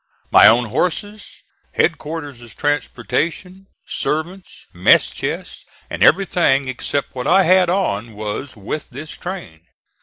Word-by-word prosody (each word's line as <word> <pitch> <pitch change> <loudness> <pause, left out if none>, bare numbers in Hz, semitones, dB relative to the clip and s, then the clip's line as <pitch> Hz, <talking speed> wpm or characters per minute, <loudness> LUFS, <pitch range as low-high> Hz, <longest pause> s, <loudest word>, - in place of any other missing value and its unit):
My - - +8
own 120 0 +4
horses, 205 - -3 0.3
headquarters' 145 -7 -3
transportation, 150 +6 -2 0.2
servants, 175 +5 -4
mess - - +4
chest, - - -5 0.3
and - - -5
everything 170 -8 +3
except 130 +2 -3
what 125 -1 -4
I 190 +2 +5
had 185 0 +4
on, 120 - -1
was 110 +6 -5
with 105 +9 -5
this 145 +4 -9
train. 175 - -8
150 Hz, 115 wpm, -19 LUFS, 125-180 Hz, 0.3 s, My